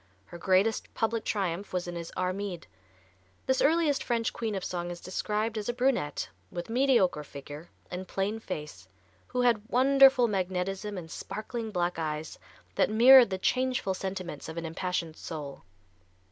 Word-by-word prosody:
Her 170 Hz, -, -11 dB
greatest 190 Hz, +5 st, +2 dB
public 225 Hz, 0 st, 0 dB
triumph 195 Hz, -1 st, -2 dB
was 180 Hz, -1 st, -1 dB
in 175 Hz, -, -5 dB
his 170 Hz, -1 st, -6 dB
"Armide." 185 Hz, -1 st, -2 dB, 0.8 s
This 260 Hz, 0 st, +2 dB
earliest 310 Hz, -2 st, +3 dB
French 235 Hz, 0 st, 0 dB
queen 220 Hz, -3 st, -3 dB
of 190 Hz, -, -3 dB
song 175 Hz, -1 st, -3 dB
is 175 Hz, 0 st, -6 dB
described 215 Hz, +5 st, -2 dB
as 210 Hz, -, -4 dB
a -, -, 0 dB
brunette, 245 Hz, -, 0 dB, 0.2 s
with 175 Hz, +4 st, -5 dB
mediocre 235 Hz, -, +3 dB
figure 145 Hz, +3 st, -10 dB, 0.2 s
and 185 Hz, +1 st, -5 dB
plain 205 Hz, +3 st, -2 dB
face, 150 Hz, -, -7 dB, 0.4 s
who 250 Hz, -, -1 dB
had 240 Hz, -4 st, +3 dB
wonderful 265 Hz, -1 st, +6 dB
magnetism 195 Hz, +1 st, -2 dB
and 165 Hz, -3 st, -8 dB
sparkling 220 Hz, +1 st, -5 dB
black 175 Hz, -4 st, -1 dB
eyes 155 Hz, 0 st, -4 dB, 0.3 s
that -, -, +2 dB
mirrored 245 Hz, +2 st, +8 dB
the 190 Hz, -, -2 dB
changeful 255 Hz, -1 st, 0 dB
sentiments 185 Hz, -5 st, -5 dB
of 160 Hz, -, -7 dB
an 170 Hz, -, -3 dB
impassioned 165 Hz, -1 st, -3 dB
soul. 145 Hz, -4 st, -7 dB
195 Hz, 155 wpm, -29 LUFS, 175-230 Hz, 0.8 s, mirrored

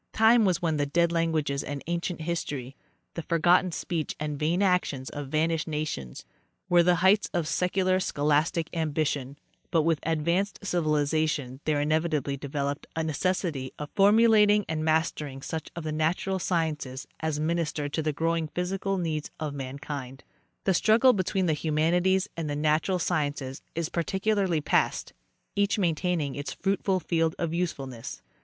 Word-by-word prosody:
Time 225 Hz, 0 st, +5 dB
was 180 Hz, -3 st, +1 dB
when 160 Hz, -2 st, +1 dB
the 145 Hz, -, +1 dB
dead 170 Hz, +3 st, +2 dB
languages 160 Hz, -4 st, 0 dB
and 145 Hz, -1 st, -5 dB
ancient 170 Hz, 0 st, -3 dB
history—the 150 Hz, -2 st, -6 dB
forgotten 175 Hz, +3 st, +3 dB
speech 165 Hz, -1 st, -3 dB
and 150 Hz, -1 st, -3 dB
vain 170 Hz, +6 st, +1 dB
actions 180 Hz, -8 st, 0 dB
of 145 Hz, -1 st, -5 dB
vanished 155 Hz, +2 st, 0 dB
nations—were 155 Hz, -, -2 dB
the 175 Hz, +1 st, +4 dB
heights 205 Hz, +2 st, +4 dB
of 170 Hz, -3 st, 0 dB
secular 185 Hz, +3 st, +1 dB
scho 145 Hz, -5 st, -2 dB
lastic 155 Hz, +3 st, +2 dB
ambition, 150 Hz, -4 st, -1 dB, 0.3 s
but 165 Hz, -2 st, +2 dB
with 165 Hz, -2 st, +2 dB
advanced 170 Hz, +5 st, 0 dB
civilization 150 Hz, -6 st, 0 dB
there 150 Hz, -2 st, +1 dB
inevitably 155 Hz, -1 st, 0 dB
developed 140 Hz, +1 st, -3 dB
a 160 Hz, -, 0 dB
necessity 160 Hz, -3 st, -1 dB
of 150 Hz, 0 st, -6 dB
formulating 210 Hz, 0 st, +5 dB
and 155 Hz, -1 st, -2 dB
mastering 155 Hz, -3 st, 0 dB
such 160 Hz, +3 st, -5 dB
of 170 Hz, -, -5 dB
the 155 Hz, -, -3 dB
natural 165 Hz, +5 st, 0 dB
sciences 155 Hz, -7 st, -2 dB
as 160 Hz, -2 st, -2 dB
minister 155 Hz, -2 st, -1 dB
to 150 Hz, +2 st, -2 dB
the 155 Hz, 0 st, 0 dB
growing 165 Hz, +1 st, 0 dB
physical 195 Hz, +2 st, -1 dB
needs"of 155 Hz, -3 st, -3 dB
mankind. 135 Hz, -1 st, -6 dB, 0.4 s
The 190 Hz, -, +2 dB
struggle 225 Hz, +7 st, +5 dB
between 190 Hz, -1 st, 0 dB
the 160 Hz, -, +2 dB
humanities 175 Hz, +6 st, +1 dB
and 165 Hz, -3 st, -3 dB
the 145 Hz, -, -2 dB
natural 155 Hz, +5 st, +1 dB
sciences 145 Hz, -6 st, -2 dB
is 165 Hz, -1 st, -1 dB
practically 190 Hz, -1 st, 0 dB
past, -, -, 0 dB, 0.4 s
each 200 Hz, +1 st, +2 dB
maintaining 170 Hz, -5 st, 0 dB
its 145 Hz, +1 st, -5 dB
fruitful 195 Hz, -1 st, 0 dB
field 165 Hz, -1 st, 0 dB
of, 165 Hz, -2 st, -2 dB
usefulness. 135 Hz, -9 st, -4 dB
160 Hz, 145 wpm, -27 LUFS, 150-180 Hz, 0.4 s, Time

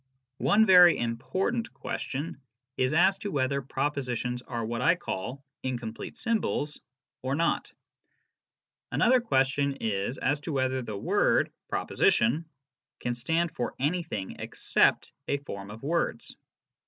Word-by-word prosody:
One 220 Hz, +2 st, +5 dB
very 180 Hz, -3 st, +8 dB
important 185 Hz, -, -1 dB
question 140 Hz, +1 st, -4 dB, 0.3 s
is 130 Hz, 0 st, +1 dB
as 185 Hz, +5 st, +4 dB
to 205 Hz, -, -4 dB
whether 140 Hz, -3 st, 0 dB
propositions 125 Hz, -3 st, -2 dB
are 115 Hz, -2 st, -4 dB
what 115 Hz, +2 st, -3 dB
I 170 Hz, -, +5 dB
call 135 Hz, -, -5 dB
" -, -, -62 dB
incomplete 120 Hz, -3 st, -5 dB
symbols 215 Hz, -10 st, -1 dB, 0.2 s
" -, -, -65 dB
or 130 Hz, +2 st, -1 dB
not. 165 Hz, +2 st, 0 dB, 1.2 s
Another 255 Hz, +1 st, +4 dB
question 140 Hz, -, +2 dB
is 110 Hz, 0 st, -2 dB
as 145 Hz, +3 st, +1 dB
to 155 Hz, +1 st, -5 dB
whether 130 Hz, -1 st, 0 dB
the 110 Hz, -4 st, -5 dB
word -, -, +2 dB
" -, -, -61 dB
proposition 140 Hz, +9 st, +2 dB, 0.3 s
" -, -, -65 dB
can 120 Hz, -, -1 dB
stand 160 Hz, +8 st, 0 dB
for 125 Hz, -6 st, -3 dB
anything 150 Hz, -, -2 dB
except -, -, +1 dB, 0.2 s
a 140 Hz, -, +1 dB
form 100 Hz, -8 st, -8 dB
of 110 Hz, +4 st, -10 dB
words. 170 Hz, +4 st, -1 dB
140 Hz, 140 wpm, -28 LUFS, 120-170 Hz, 1.2 s, very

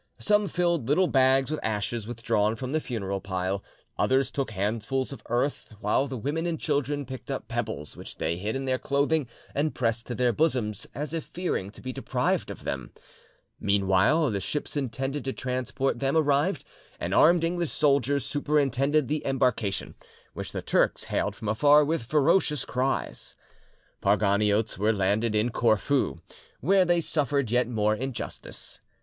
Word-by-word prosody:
Some 210 Hz, 0 st, +2 dB
filled 170 Hz, -8 st, 0 dB
little 165 Hz, +7 st, +4 dB
bags 135 Hz, -2 st, +3 dB
with 155 Hz, -, -1 dB
ashes 110 Hz, +1 st, -2 dB
withdrawn 115 Hz, -2 st, 0 dB
from 130 Hz, +3 st, -5 dB
the 155 Hz, -, +1 dB
funeral 100 Hz, -8 st, -3 dB
pile; 95 Hz, +1 st, -2 dB, 0.4 s
others 130 Hz, 0 st, +2 dB
took 135 Hz, -5 st, -2 dB
handfuls 110 Hz, +7 st, -2 dB
of -, -, -10 dB
earth, 120 Hz, -1 st, -1 dB
while 110 Hz, +6 st, +1 dB
the 130 Hz, -1 st, -5 dB
women 150 Hz, +8 st, -2 dB
and 165 Hz, -2 st, -2 dB
children 145 Hz, -1 st, -1 dB
picked 130 Hz, 0 st, -8 dB
up -, -, -4 dB
pebbles 75 Hz, +1 st, -4 dB
which -, -, -9 dB
they 85 Hz, -, -1 dB
hid 105 Hz, +6 st, -3 dB
in 135 Hz, 0 st, -3 dB
their 130 Hz, -1 st, 0 dB
clothing 140 Hz, 0 st, +1 dB, 0.3 s
and 150 Hz, +2 st, 0 dB
pressed 115 Hz, -1 st, -1 dB
to 120 Hz, -, -3 dB
their 125 Hz, -1 st, +2 dB
bosoms, 115 Hz, -7 st, 0 dB
as 150 Hz, +4 st, -4 dB
if 165 Hz, -2 st, -3 dB
fearing 175 Hz, -, -3 dB
to 105 Hz, -, -14 dB
be 130 Hz, 0 st, -4 dB
deprived -, -, -1 dB
of -, -, -8 dB
them. 65 Hz, -3 st, -4 dB, 0.7 s
Meanwhile, 100 Hz, -, +3 dB
the 100 Hz, -, -1 dB
ships 145 Hz, +12 st, -3 dB
intended 135 Hz, +1 st, -2 dB
to 135 Hz, -, -1 dB
transport 130 Hz, +1 st, -2 dB
them 135 Hz, +3 st, +1 dB
arrived, 150 Hz, +4 st, +2 dB, 0.3 s
and -, -, -2 dB
armed 170 Hz, +1 st, +5 dB
English 170 Hz, -1 st, 0 dB
soldiers 140 Hz, -1 st, +2 dB
superintended 145 Hz, -1 st, +1 dB
the 150 Hz, +1 st, -1 dB
embarkation, 125 Hz, -7 st, 0 dB, 0.4 s
which -, -, -6 dB
the -, -, -5 dB
Turks -, -, +2 dB
hailed -, -, -1 dB
from 110 Hz, -, -7 dB
afar 145 Hz, +7 st, +5 dB
with, 155 Hz, -5 st, -1 dB
ferocious 150 Hz, +2 st, +3 dB
cries. 130 Hz, +2 st, -2 dB, 0.6 s
The -, -, -20 dB
Parganiotes 105 Hz, +1 st, +2 dB
were 110 Hz, +2 st, +3 dB
landed 105 Hz, +3 st, +1 dB
in 110 Hz, +3 st, +2 dB
Corfu, 115 Hz, +5 st, +2 dB, 0.4 s
where 185 Hz, +5 st, +4 dB
they 175 Hz, -1 st, +3 dB
suffered 140 Hz, -6 st, 0 dB
yet 125 Hz, 0 st, +3 dB
more 110 Hz, -3 st, +1 dB
injustice. 130 Hz, +1 st, -6 dB
130 Hz, 165 wpm, -27 LUFS, 110-145 Hz, 0.7 s, armed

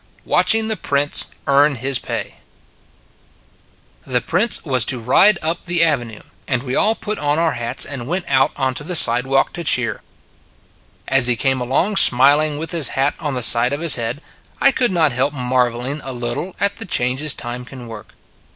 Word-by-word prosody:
WATCHING 220 Hz, 0 st, +2 dB
THE 220 Hz, -, -1 dB
PRINCE 145 Hz, -2 st, 0 dB, 0.2 s
EARN 140 Hz, +1 st, +2 dB
HIS 130 Hz, +1 st, -2 dB
PAY -, -, -6 dB, 1.7 s
THE 125 Hz, -1 st, -1 dB
Prince 180 Hz, -, -1 dB
was 130 Hz, -5 st, +2 dB
to 125 Hz, -, +3 dB
ride 185 Hz, -, +3 dB
up 165 Hz, +2 st, -3 dB
the 175 Hz, -1 st, +2 dB
Avenue, 120 Hz, -9 st, -2 dB, 0.2 s
and 125 Hz, -2 st, -2 dB
we 130 Hz, -1 st, -4 dB
all 220 Hz, +2 st, +3 dB
put 210 Hz, -1 st, -6 dB
on 145 Hz, 0 st, -1 dB
our 165 Hz, -1 st, +1 dB
hats 120 Hz, +1 st, +1 dB
and 130 Hz, -4 st, -8 dB
went 180 Hz, +3 st, -3 dB
out 135 Hz, -1 st, +1 dB
onto 130 Hz, +1 st, -3 dB
the 180 Hz, +4 st, -5 dB
side 125 Hz, -4 st, +4 dB
walk 135 Hz, 0 st, 0 dB
to 170 Hz, -, -6 dB
cheer. 125 Hz, -6 st, +1 dB, 1.1 s
As 135 Hz, -2 st, +5 dB
he 125 Hz, -, +1 dB
came 130 Hz, +1 st, -1 dB
along 165 Hz, -, -1 dB
smiling, 145 Hz, +4 st, +4 dB
with 160 Hz, +2 st, -6 dB
his 165 Hz, -6 st, 0 dB
hat 135 Hz, +2 st, +1 dB
on 145 Hz, -5 st, -4 dB
the 125 Hz, -, -2 dB
side 120 Hz, +3 st, +4 dB
of 145 Hz, -, -3 dB
his 170 Hz, -3 st, +5 dB
head, 120 Hz, +5 st, -5 dB, 0.4 s
I 275 Hz, -, +4 dB
could 250 Hz, -2 st, 0 dB
not 165 Hz, -5 st, +1 dB
help 135 Hz, +4 st, -1 dB
marvelling 125 Hz, +2 st, -2 dB
a 130 Hz, -, -7 dB
little 120 Hz, +9 st, -5 dB
at 200 Hz, 0 st, -1 dB
the 225 Hz, -, -6 dB
changes 130 Hz, +1 st, -1 dB
time 120 Hz, +1 st, -7 dB
can 130 Hz, -1 st, -12 dB
work. 110 Hz, -3 st, -12 dB
135 Hz, 185 wpm, -18 LUFS, 125-165 Hz, 1.7 s, As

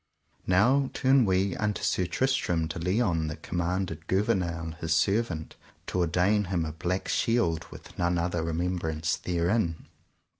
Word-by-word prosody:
Now 125 Hz, +9 st, +4 dB
turn 130 Hz, -2 st, +4 dB
we 95 Hz, -1 st, +1 dB
unto 105 Hz, -1 st, -1 dB
Sir 90 Hz, -, +1 dB
Tristram 90 Hz, -6 st, 0 dB
de 80 Hz, +2 st, -5 dB
Liones, 90 Hz, -3 st, +1 dB
that 75 Hz, -, -8 dB
commanded 85 Hz, -2 st, -2 dB
Gouvernail, 85 Hz, -4 st, 0 dB
his 80 Hz, -1 st, +1 dB
servant, 95 Hz, -4 st, 0 dB, 0.3 s
to 90 Hz, -, -2 dB
ordain 90 Hz, +5 st, +2 dB
him 90 Hz, -3 st, -1 dB
a 80 Hz, -, -4 dB
black 90 Hz, +4 st, -2 dB
shield 115 Hz, -9 st, +1 dB
with -, -, -13 dB
none 85 Hz, 0 st, +1 dB
other 85 Hz, 0 st, -1 dB
remembrance 80 Hz, -1 st, -1 dB
therein. 85 Hz, 0 st, -1 dB
90 Hz, 140 wpm, -28 LUFS, 80-100 Hz, 0.3 s, Now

